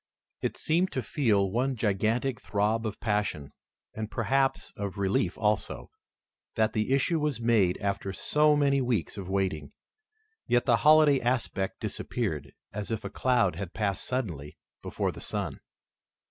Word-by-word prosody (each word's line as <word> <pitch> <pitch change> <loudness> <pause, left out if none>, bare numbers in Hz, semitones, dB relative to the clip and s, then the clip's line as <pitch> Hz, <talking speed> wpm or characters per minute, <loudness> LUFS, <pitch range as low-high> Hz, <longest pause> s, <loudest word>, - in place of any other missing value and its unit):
It - - -2
seemed 175 +4 +1
to 130 - -2
feel 105 -8 +1
one 130 +4 0
gigantic 115 +4 0
throb 110 +2 0
of 105 - -6
passion, 105 -10 -1 0.4
and 110 0 -4
perhaps 135 +4 0
of 100 -1 -5
relief 95 -2 0
also, 105 -1 -1 0.6
that 110 -1 +2
the 110 +3 0
issue 140 +5 +2
was 150 -5 -1
made 110 -6 +3
after 100 -1 -2
so 150 +9 +3
many 140 -2 +3
weeks 120 -8 -1
of 95 -2 -7
waiting. 95 -7 -1 0.7
Yet 120 0 +2
the 120 -2 +4
holiday 150 +2 +6
aspect 120 -6 -1
disappeared, 80 - -3 0.2
as 105 0 -4
if 110 -2 -3
a - - -5
cloud 125 -8 +2
had 95 -3 -6
passed 100 -3 -1
suddenly 85 - -4 0.2
before - - -2
the - - -11
sun. - - -4
110 Hz, 145 wpm, -28 LUFS, 100-130 Hz, 0.7 s, holiday